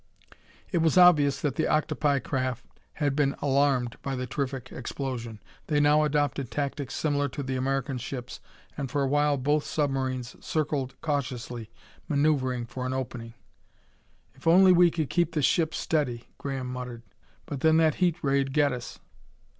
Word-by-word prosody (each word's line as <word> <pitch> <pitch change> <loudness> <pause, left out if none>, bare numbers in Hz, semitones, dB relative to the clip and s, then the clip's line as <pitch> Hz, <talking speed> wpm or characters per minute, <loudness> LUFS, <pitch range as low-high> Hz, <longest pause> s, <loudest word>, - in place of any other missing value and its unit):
It 175 - +1
was 160 +1 +2
obvious 150 -6 +6
that 140 -3 -1
the 160 - +1
octopi 150 -1 +1
craft 130 -2 -2 0.3
had 145 -3 -1
been 140 -2 +1
alarmed 135 -4 +1
by 135 -1 -3
the 125 0 -3
terrific 130 -1 -4
explosion. 120 -5 -5 0.3
They 150 -2 +2
now 150 +1 +4
adopted 145 -3 0
tactics 140 -1 -3
similar 145 -2 0
to 140 +2 -5
the 130 0 -3
American 135 0 -1
ship's, 125 0 -6 0.4
and 140 -3 -4
for 140 +2 0
awhile 145 +1 +2
both 145 +3 +1
submarines 130 -4 -2
circled 145 -4 -2
cautiously, 125 -6 -3 0.4
maneuvering 140 -5 +1
for 125 +2 -5
an 130 - -2
opening. 120 -3 -5 1.0
"If - - -10
only 185 +3 +7
we 175 -1 +6
could 160 -4 -3
keep 175 0 +1
the 150 - 0
ship 160 +2 +2
steady!" 125 -7 -1
Graham 135 -2 -4
muttered. 125 -2 -6 0.4
"But 140 - -5
then 160 +3 +4
that 160 -2 +4
heat 175 -3 +3
ray'd 135 -1 +1
get 145 -2 +3
us!" 125 -1 -7
140 Hz, 155 wpm, -27 LUFS, 130-150 Hz, 1.0 s, only